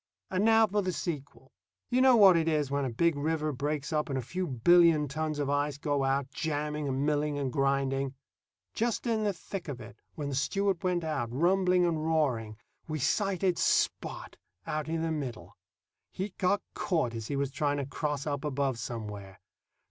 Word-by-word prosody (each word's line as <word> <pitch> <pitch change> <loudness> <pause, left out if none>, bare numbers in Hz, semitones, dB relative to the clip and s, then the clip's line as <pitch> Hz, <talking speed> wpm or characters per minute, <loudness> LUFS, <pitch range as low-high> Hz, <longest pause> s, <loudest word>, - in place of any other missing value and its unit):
And 190 +1 +1
now 225 0 +6
for 210 0 0
the 185 -1 -1
sequel. 145 -6 -5 0.4
You 250 +1 +3
know 260 -1 +7
what 195 -5 +8
it 165 -1 +1
is 150 -4 +1
when 140 -1 0
a - - -1
big 165 +7 +2
river 155 +1 -1
breaks 145 +2 -3
up 150 -1 0
and 135 - -1
a - - -1
few 180 +9 -3
billion 160 +3 +5
tons 155 +2 -3
of 145 -2 -1
ice 145 0 0
go 145 -1 0
out, 135 0 0
jamming 150 -1 -2
and 135 +1 -1
milling 150 -1 0
and 135 -3 -2
grinding. 135 -1 0 0.6
Just 235 +2 -1
in 225 -2 +1
the 205 - +2
thick 185 0 -7
of 140 -5 -5
it, 115 -1 -11 0.2
when 150 -2 -4
the - - -4
Stewart 195 +7 0
went 180 -2 0
out, 135 -8 -2
rumbling 180 +5 +3
and 160 -3 0
roaring, 130 -10 0 0.3
we 155 -1 -3
sighted 185 +5 +1
Spot - - 0 0.3
out 155 0 -3
in 165 0 -1
the 165 - -1
middle. 130 -8 -5 0.5
He'd 190 +1 -5
got 200 +2 +2
caught 160 -10 0
as 115 -1 -5
he 145 - -2
was 140 -1 -1
trying 145 +2 0
to 140 - -2
cross 145 0 -3
up 145 -2 -2
above 140 -4 -1
somewhere. 105 -4 -6
150 Hz, 190 wpm, -30 LUFS, 135-175 Hz, 0.6 s, what